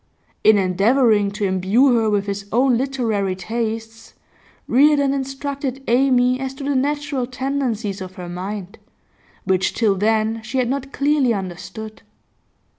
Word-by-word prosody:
In 215 -1 +6
endeavouring 205 +3 +3
to 210 0 -2
imbue 195 +8 +3
her 225 -2 +2
with 205 -1 0
his 200 0 -4
own 250 +2 +3
literary 230 -7 -1
tastes, 225 +2 -5 0.5
Reardon 280 +1 +4
instructed 270 0 -4
Amy 250 0 +3
as 265 0 -4
to 275 - -8
the 285 +1 0
natural 285 -1 -1
tendencies 250 -6 -2
of 185 0 -8
her 180 -1 -7
mind, 190 +3 -6 0.6
which 190 -1 0
till 220 -4 +2
then 220 +3 0
she 235 +4 -5
had 250 -2 +1
not 270 0 -3
clearly 280 -5 +2
understood. 200 +4 -7
230 Hz, 135 wpm, -20 LUFS, 205-270 Hz, 0.6 s, In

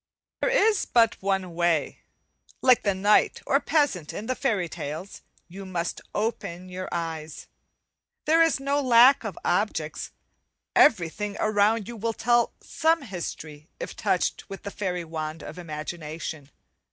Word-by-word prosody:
There - - +2
is 440 -4 +3
but 230 -2 +3
one 190 -2 -1
way. 170 -3 0 0.6
Like 255 -2 +6
the 200 -2 0
knight 205 +3 +3
or - - +3
peasant 280 - 0
in 210 - -5
the 255 - 0
fairy 225 -10 0
tales, 160 +4 -7 0.3
you 190 +3 -9
must 180 -3 -3
open 185 -5 -3
you 185 0 -5
eyes. 160 -2 -4 0.8
There 325 +2 +4
is 325 -4 +3
no 280 +1 0
lack 255 +1 +6
of - - -5
objects, - - -1 0.7
everything 205 - +3
around 215 0 +2
you 240 - -7
will 225 +1 -2
tell 240 +1 +2
some 325 -1 +1
history 160 - -7
if - - -6
touched - - -1
with 195 - -8
the 200 - -5
fairy 180 -4 -3
wand 155 -1 -5
of - - -8
imagination. 155 -2 -6
195 Hz, 140 wpm, -26 LUFS, 170-240 Hz, 0.8 s, Like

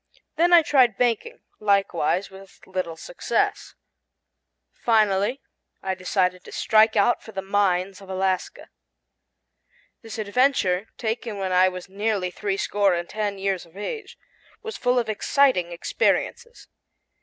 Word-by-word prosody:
Then 340 +3 +3
I 345 -2 +8
tried 255 -8 +3
banking, 250 - -1 0.2
likewise 195 -3 +1
with 190 0 -14
little 185 -3 -4
success. - - -2 1.0
Finally 215 +2 +1 0.4
I 190 - -1
decided 185 -1 -1
to - - -11
strike 220 0 +3
out 205 +4 +3
for 220 - -12
the 195 - -4
mines 195 -1 0
of 195 - -13
Alaska. 190 -1 -2 1.3
This 225 -2 -8
adventure, 215 -3 +1
taken 225 -1 -3
when 190 -1 -2
I 185 +1 +5
was 185 0 -8
nearly 200 -1 -1
three 195 +1 -3
score 200 -2 +1
and 175 0 -4
ten 210 -2 -3
years 195 -1 -1
of 170 +2 -18
age, 435 - -6 0.5
was 445 -1 -6
full 250 0 +1
of 235 -2 +1
exciting 215 -4 +2
experiences. 470 - -1
200 Hz, 130 wpm, -24 LUFS, 185-230 Hz, 1.3 s, I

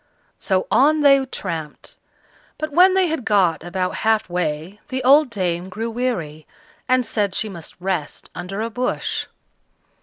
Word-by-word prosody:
So 190 -2 0
on 300 +4 +4
they 275 -2 +6
tramped; 165 - -6 0.6
but 310 0 -4
when 370 +5 +6
they 380 -1 +4
had 320 -6 -2
got 185 -8 +2
about 185 +1 -2
half 220 -1 +2
way, 175 +2 -3
the 260 -2 -3
old 280 +2 +6
dame 180 -4 -2
grew 225 +4 -4
weary, 175 - -3 0.4
and 255 -1 +3
said 205 -4 -1
she 215 - -1
must 170 -5 -9
rest 180 -5 -4
under 195 +4 -5
a 230 +1 -3
bush. 250 +2 -2
210 Hz, 150 wpm, -21 LUFS, 175-255 Hz, 0.6 s, they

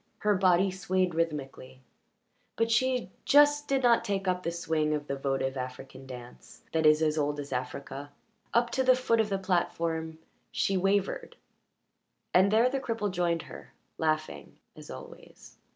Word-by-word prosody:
Her 210 0 +2
body 185 0 +3
swayed 185 -1 0
rhythmically, 140 -5 -4 0.7
but 230 0 0
she 250 -2 +1
just 290 0 +5
did 270 -1 +1
not 235 -1 +4
take 195 -3 -2
up 180 0 +1
the 170 - -2
swing 160 -3 0
of 145 -1 -4
the 140 - -3
votive 135 -1 -1
African 130 +1 -7
dance 120 - -11
that 160 -1 +3
is 155 +1 +5
as 155 0 +1
old 145 0 -1
as 145 0 -5
Africa. 135 +3 -5 0.4
Up 235 0 +2
to 265 - +1
the 255 0 +5
foot 240 -3 +1
of 220 -1 +2
the 195 - 0
platform 165 -3 -1 0.3
she 195 - 0
wavered, 195 +1 0 1.0
and 190 +2 +5
there 225 +4 +4
the 270 +2 -1
cripple 225 -6 -2
joined 175 -2 0
her, - - -12 0.2
laughing 155 -1 -2 0.2
as - - -12
always. - - -12
175 Hz, 160 wpm, -29 LUFS, 145-210 Hz, 1.0 s, just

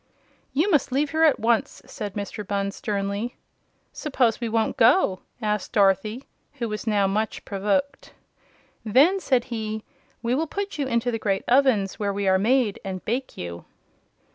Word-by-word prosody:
"You 330 +9 +1
must 295 -5 +2
leave 280 +3 +1
here 320 0 +4
at 305 - +4
once!" 235 +4 +1
said 205 -6 -6
Mr. 205 +1 -5
Bunn, 200 0 -2
sternly. 205 +1 -3 0.6
"Suppose 255 -6 0
we 235 - -1
won't 225 0 0
go?" 230 - +4 0.2
said 210 -3 -1
Dorothy, 205 +4 +2 0.3
who 245 -5 -3
was 210 +1 -5
now 205 -2 +3
much 210 +3 -1
provoked. 205 +8 -1 0.7
"Then," 275 - +4
said 255 -9 +2
he, 220 -1 -3 0.4
"we 235 +1 +1
will 315 +5 0
put 400 +1 -4
you 280 - 0
into 240 0 0
the 225 - -2
great 195 -2 0
ovens 245 -7 +3
where 205 -1 0
we 200 0 -2
are 190 0 +4
made, 235 0 +2
and 190 -1 -5
bake 255 +4 -3
you." 85 -1 -6
225 Hz, 165 wpm, -24 LUFS, 200-265 Hz, 0.7 s, here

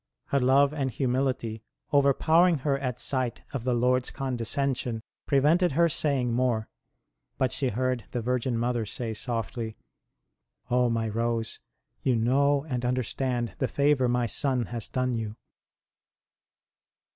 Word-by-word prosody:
Her 140 - +2
love 135 +3 +4
and 140 -3 -1
humility, 125 -3 -1 0.3
overpowering 160 +5 +4
her 140 -2 +3
at 125 -3 -3
sight 130 -3 -1
of 130 -4 -4
the 125 -1 +2
Lord 125 +1 +2
s - - -3
condescension, 125 -2 -2 0.2
prevented 150 +5 +3
her 170 +3 +4
saying 140 -6 0
more; 120 -3 +1 0.7
but 130 - +1
she 135 -3 -1
heard 125 -1 -1
the 120 - -3
Virgin 125 +1 0
Mother 120 0 0
say 110 +2 -4
softly: 115 0 -4 0.5
" - - -29
Oh 125 0 +3
my 115 -1 0
Rose, 115 +1 -1 0.4
you 130 - +2
know 140 +5 +2
and 125 -4 -2
understand 125 0 -1
the 130 - +1
favour 140 -2 +2
my 120 0 +1
Son 125 +2 0
has 115 -3 -4
done 130 -1 0
you 110 -2 -3
125 Hz, 140 wpm, -27 LUFS, 115-135 Hz, 0.7 s, love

